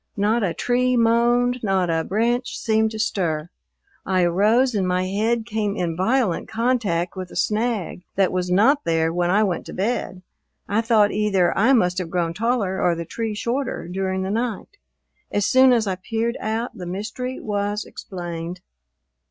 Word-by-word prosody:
Not 215 +4 +2
a 185 -5 -1
tree 250 +1 +1
moaned, 240 +2 +3
not 190 -4 +1
a 165 0 0
branch 235 +7 -1
seemed 220 0 +1
to 220 - -7
stir. 175 -7 -1 0.5
I 185 -1 +1
arose 215 +9 +3
and 195 -3 0
my 180 0 +1
head 220 +4 0
came 210 -3 -2
in 170 -2 -2
violent 210 +1 +1
contact 220 -8 0
with 185 -1 -6
a - - -12
snag 215 -4 -1
that 195 -2 +2
was 180 0 -1
not 225 +11 +4
there 165 -1 +1
when 175 0 0
I 205 +4 +4
went 190 -4 -2
to - - -8
bed. 190 -3 -2 0.4
I 210 +3 +1
thought 220 -3 +3
either 200 -4 +1
I 230 +7 +4
must 180 -7 +2
have 180 -3 -4
grown 170 -2 -1
taller 210 -2 0
or 175 -1 +2
the 170 0 -5
tree 225 +4 -4
shorter 240 -3 -2
during 190 +1 -2
the 190 - -2
night. 235 - -3 0.5
As 205 -1 +1
soon 260 0 +6
as 235 -3 +3
I 195 - 0
peered 225 +5 -2
out, 225 +3 -2
the 180 - -7
mystery 215 +8 -4
was 205 0 -2
explained. 175 -1 -7
205 Hz, 175 wpm, -22 LUFS, 180-230 Hz, 0.5 s, soon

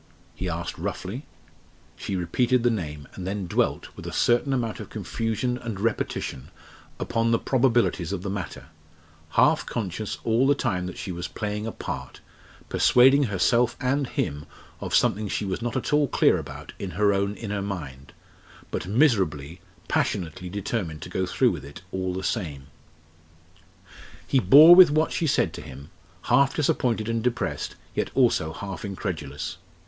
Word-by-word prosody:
he 95 - -4
asked 85 0 -4
roughly. 115 +11 -5 0.7
She 100 - -4
repeated 115 +8 +1
the 120 - +4
name, 75 -9 -4
and 90 -1 -6
then 100 0 -3
dwelt, 85 - -1
with - - -9
a - - -4
certain 120 +3 +2
amount 120 -4 -1
of - - -8
confusion 115 +4 -2
and 115 -5 -5
repetition, 105 - -2 0.5
upon 115 0 0
the 115 - +4
probabilities 120 -10 +1
of 95 -2 -3
the 100 - -3
matter 95 -5 -5 0.7
half - - +5
conscious 105 -1 -3
all 115 +4 +3
the 145 - +4
time 90 -9 -1
that 90 - -7
she 95 - -5
was 85 0 -4
playing 105 +2 -4
a - - -3
part, 65 -9 -6 0.5
persuading 135 +3 +5
herself 115 +4 +2
and 135 +1 0
him 75 -8 -3 0.3
of - - -2
something 105 +2 +2
she 100 - -2
was 95 +3 -3
not 120 +1 -2
at 130 - -2
all 150 -1 +4
clear - - +3
about - - -9
in - - -4
her 105 -1 +4
own 100 +1 0
inner 105 -3 -4
mind 75 -10 -6 0.6
but 90 - -3
miserably, 95 - +1 0.3
passionately 90 +1 -1
determined 95 -5 -3
to - - -8
go 95 0 -1
through 95 - +3
with - - -6
it 70 +4 -11
all 95 -1 -2
the 95 +1 -4
same. 75 - -3 1.6
He 135 - +2
bore 145 - +9
with 180 -2 +9
what 155 +2 +1
she 165 - 0
said - - +1
to - - -7
him, 70 +2 -11 0.3
half 140 -1 +3
disappointed 120 -7 +1
and 115 0 0
depressed, 110 -11 -2 0.2
yet - - -1
also 80 0 +3
half 100 +3 -7
incredulous. 80 -7 -5
100 Hz, 165 wpm, -25 LUFS, 90-120 Hz, 1.6 s, bore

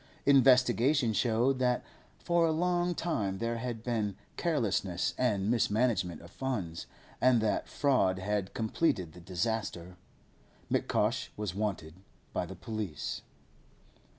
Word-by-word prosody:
Investigation 130 -1 +5
showed 120 +4 +2
that 125 -1 +1 0.3
for 170 -1 +2
a - - +2
long 175 +1 +1
time 105 - -1
there 115 +2 -2
had 115 -1 -4
been 110 -5 -1 0.2
carelessness 100 - 0
and 105 -5 +1
mismanagement 105 -6 +1
of 85 - -13
funds, 100 -12 -4 0.3
and 125 -2 +5
that 110 -1 0
fraud 130 -10 +2
had 100 0 -2
completed 110 - 0
the 90 - -12
disaster. 90 -1 -3 0.7
M'Cosh - - +1
was 105 -4 -3
wanted 95 -6 -3 0.4
by 90 - -1
the 95 - -8
police. 100 -3 -4
110 Hz, 120 wpm, -31 LUFS, 95-130 Hz, 0.7 s, Investigation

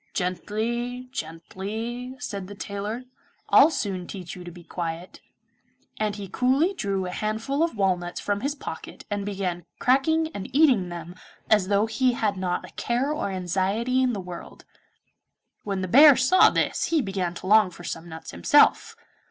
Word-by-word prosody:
'Gently, 235 +7 -2
gently,' 220 +8 -5
said 200 -9 -5
the 205 - -9
tailor, 205 +5 -5 0.5
'I'll - - +7
soon 200 - -3
teach 185 -3 -7
you 180 - -9
to 175 - -8
be 175 0 -13
quiet,' 170 +1 -6 0.8
and 210 -1 0
he 200 -2 -7
coolly 265 - +2
drew 195 - -2
a 180 - -4
handful 220 - -2
of 330 -8 0
walnuts 180 -3 0
from 205 0 -2
his 285 +3 -1
pocket - - -8
and 205 -1 -2
began 185 -3 -3
cracking 315 +6 +2
and 195 - -6
eating 260 - +4
them 170 0 -7 0.4
as 210 -4 +4
though 200 +1 +3
he 250 +3 +1
had 215 -4 0
not 185 -1 -2
a - - -17
care 245 +5 -1
or 305 - -2
anxiety 195 +7 0
in 255 -1 +2
the 205 - -3
world. 180 -2 -9 1.0
When 195 -2 -2
the 185 - -2
bear 285 - +8
saw 300 +9 +6
this - - 0
he 330 - +2
began 185 -3 -2
to - - -8
long 210 0 +5
for 175 0 -13
some 170 0 -6
nuts 160 -1 -8
himself. 85 - +4
205 Hz, 170 wpm, -25 LUFS, 185-250 Hz, 1.0 s, bear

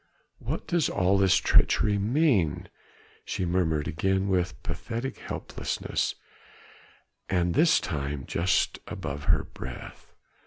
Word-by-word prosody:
"What - - -4
does 170 -3 +1
all 95 0 +2
this 95 -2 +5
treachery 105 -1 +3
mean?" 110 - +2 0.5
she 95 - -2
murmured 85 -4 0
again 95 +5 0
with 90 -1 -1
pathetic 120 +3 -4
helplessness, - - -3 1.1
and 90 -2 +1
this 165 - +5
time 70 -2 -3
just 90 +2 +1
above 75 +1 -5
her - - +3
breath. - - -10
95 Hz, 110 wpm, -27 LUFS, 80-105 Hz, 1.1 s, this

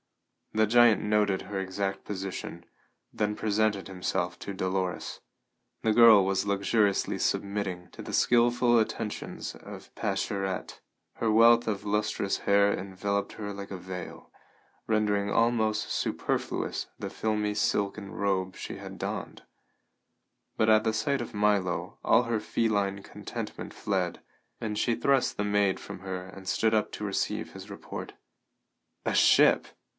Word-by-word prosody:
The 110 0 +4
giant 120 -1 +5
noted 105 -2 +1
her 100 -1 -4
exact 95 +1 -3
position, 95 -3 -6 0.5
then 105 0 -1
presented 105 -2 0
himself 90 -1 -2
to 100 - -6
Dolores. 95 -1 -2 0.6
The 110 - +3
girl 110 -4 +8
was 95 +1 0
luxuriously 100 0 +1
submitting 100 -3 -2
to - - -10
the - - -7
skilful 120 0 +4
attentions 110 -1 -3
of - - -11
Pascherette; 95 -1 -2 0.4
her 115 - +1
wealth 115 +2 +6
of 105 -2 -2
lustrous 105 -1 0
hair 100 0 +3
enveloped 100 +2 -3
her 100 -2 -5
like 100 0 -8
a 95 - -4
veil, 90 -1 -8 0.6
rendering 105 -2 +1
almost 110 -2 +1
superfluous - - -2
the - - -5
filmy 105 -1 -1
silken 100 -1 -1
robe 95 -2 -1
she - - -6
had - - -9
donned. - - -5 1.1
But 110 - +3
at 110 0 +4
sight 135 +5 0
of 115 - -7
Milo 105 -4 0
all 115 +2 +5
her 115 -2 -1
feline 100 -3 0
contentment - - -7
fled, - - -2 0.4
and 105 -2 -3
she 120 +2 +1
thrust 135 0 +2
the 105 - 0
maid 100 -2 +2
from - - -8
her 95 -1 -5
and 95 0 -11
stood 110 +3 +2
up 110 -1 +1
to 105 - -4
receive 100 -1 -2
his - - -10
report. - - -7 0.9
"A - - 0
ship?" - - +5
105 Hz, 135 wpm, -28 LUFS, 95-110 Hz, 1.1 s, girl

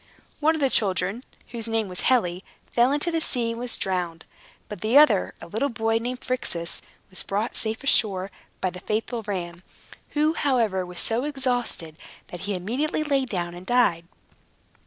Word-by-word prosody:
One 315 +2 +3
of 315 - -4
the 270 -2 +3
children, 195 +3 +2 0.3
whose 230 -2 -4
name 225 -2 0
was 180 -1 -5
Helle, 180 -9 +3 0.3
fell 245 +2 +4
into 295 +4 0
the 330 -1 0
sea 235 -6 -1
and 230 - -5
was 245 -1 -2
drowned. 175 -4 -2 0.4
But 210 -4 -8
the 225 +5 +4
other 290 -10 +5
(a - - -9
little 220 +11 -1
boy, 225 -1 +1
named 245 +2 -4
Phrixus) 175 -10 -2 0.3
was 185 - +1
brought 210 +4 -2
safe 220 +2 -2
ashore 200 -8 +2 0.3
by 185 - +1
the 180 - -8
faithful 225 +4 -2
ram, 180 -4 -4 0.6
who, 305 +2 +4
however, 225 - +1
was 180 -1 -5
so 230 +3 +2
exhausted 245 - -2 0.3
that 175 - -7
he 200 - 0
immediately 250 - -1
lay 280 -3 +1
down 175 -7 -3
and 175 +1 -9
died. 200 -9 +3
225 Hz, 175 wpm, -25 LUFS, 185-255 Hz, 0.6 s, other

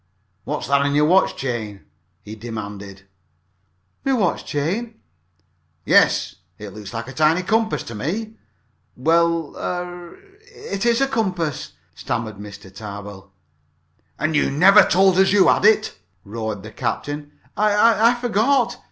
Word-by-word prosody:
"What's - - -3
that 140 +1 +3
on 140 0 0
your 150 +1 +4
watch 185 +5 +3
chain?" 110 -6 -4 0.4
he 105 - -9
demanded. 100 -3 -8 1.0
"My 270 - +1
watch 205 -9 0
chain?" 200 +11 -3 0.9
"Yes. - - +3 0.2
It 105 -1 -8
looks 105 -2 -9
like 115 +1 -5
a - - -7
tiny 155 +4 +2
compass 220 +3 0
to 115 - -9
me." 195 - -4 0.6
"Why 160 +7 +2 0.4
er 175 -1 -6 0.2
it 425 - -5
is 235 +2 +2
a 275 - +3
compass," 185 - -2 0.2
stammered 110 -2 -4
Mr. 100 -2 -11
Tarbill. 100 -2 -9 0.9
"And 155 0 -1
you - - +2
never 195 +8 +6
told 190 0 +3
us 190 - +5
that - - +1
you 200 -2 +5
had - - +2
it!" 215 0 +3 0.3
roared 110 -1 -5
the 110 - -9
captain. 145 +5 -4 0.2
"I 215 +2 +4
I 245 - +1
forgot 245 +3 +1
it!" - - -17
155 Hz, 145 wpm, -21 LUFS, -, 1.0 s, never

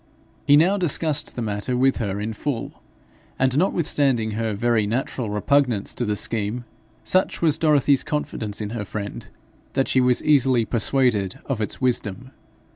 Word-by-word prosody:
He 145 0 +7
now 180 +6 +4
discussed 155 -4 -1
the 120 - -3
matter 105 +4 -2
with 135 +1 +3
her 100 -3 -3
in 110 +2 -3
full, 125 +2 -5 0.6
and, 130 -1 +1
notwithstanding 140 - +1
her 110 0 -2
very 110 -1 +1
natural 120 0 -2
repugnance 115 +1 +1
to 120 - -2
the 105 -1 -1
scheme, 110 +3 -2 0.4
such 185 0 +1
was 160 -3 +2
Dorothy's 145 -3 +3
confidence 120 -9 -3
in 105 0 -4
her 115 -3 -4
friend 100 +1 -6 0.5
that 135 - +1
she 130 - +2
was 125 -1 +2
easily 130 -5 +3
persuaded 110 -4 0
of 130 -5 -3
its 105 - -4
wisdom. 125 -1 -1
125 Hz, 155 wpm, -23 LUFS, 105-140 Hz, 0.6 s, He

